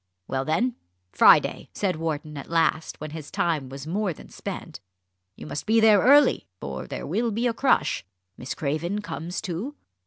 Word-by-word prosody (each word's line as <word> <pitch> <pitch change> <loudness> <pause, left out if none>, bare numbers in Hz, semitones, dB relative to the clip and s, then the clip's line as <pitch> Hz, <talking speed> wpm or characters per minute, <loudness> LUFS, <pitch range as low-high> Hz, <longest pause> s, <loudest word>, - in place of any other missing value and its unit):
"Well 135 0 -2
then, 225 +11 0 0.3
Friday," - - +5
said 195 -3 0
Wharton 155 -1 -3
at 140 - -8
last, 165 -1 +1
when 155 0 -6
his 155 -2 -7
time 155 -6 -1
was 135 +1 -8
more 190 +3 -1
than - - -14
spent. - - -7 0.6
"You - - -10
must 145 +7 -5
be 225 +1 +4
there 220 -2 +6
early, 285 +2 +5
for 65 -2 -6
there - - -5
will 220 +10 0
be 225 +3 -1
a 240 - +2
crush. 270 +4 +2 0.3
Miss 125 - -6
Craven 165 +8 -2
comes 170 +1 -5
too? 220 - -4
165 Hz, 175 wpm, -25 LUFS, 150-215 Hz, 0.6 s, there